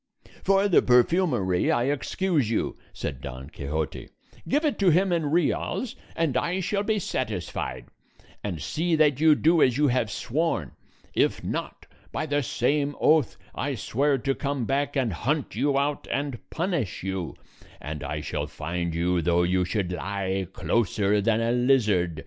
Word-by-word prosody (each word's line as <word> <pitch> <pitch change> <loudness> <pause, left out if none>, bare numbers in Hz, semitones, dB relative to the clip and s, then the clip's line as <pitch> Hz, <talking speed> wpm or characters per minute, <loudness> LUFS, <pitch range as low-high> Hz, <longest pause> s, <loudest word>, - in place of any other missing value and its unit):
"For 195 +1 +3
the 190 - +5
perfumery 125 - +3
I 120 - +2
excuse 145 - 0
you," 115 - -1 0.2
said 65 -3 -5
Don 65 +1 -8
Quixote; 75 +2 -4 0.4
"give 295 +4 +1
it 295 - 0
to 195 -3 +5
him 180 +3 +3
in 165 -3 +1
reals, 175 - 0 0.2
and 160 -6 0
I 170 +8 0
shall 200 +2 0
be 215 +1 0
satisfied; 110 - -3 0.6
and 95 -6 -3
see 160 - 0
that 150 -3 +3
you 155 -1 +6
do 165 +2 +3
as 130 -1 +4
you 145 -1 +3
have 120 -3 +1
sworn; 130 - -1 0.4
if - - +1
not, - - -4 0.3
by - - -2
the 145 -1 0
same 140 +3 0
oath 155 -6 +3 0.2
I - - -2
swear 140 +3 +1
to 135 +2 0
come 140 -3 -2
back 140 +3 0
and 125 -7 +1
hunt 140 - -1
you 140 -1 +1
out 145 +1 -1
and 140 -4 -2
punish 165 - -2
you; 95 -3 -3 0.4
and 75 0 -6
I 75 +2 -3
shall - - -3
find 85 -1 -3
you 85 +1 +1
though 85 +1 +2
you 90 +1 +2
should 95 -2 -1
lie 95 0 -2
closer 105 -1 +1
than 115 +2 +2
a 115 +1 +1
lizard. 110 - +2
125 Hz, 160 wpm, -26 LUFS, 95-155 Hz, 0.6 s, you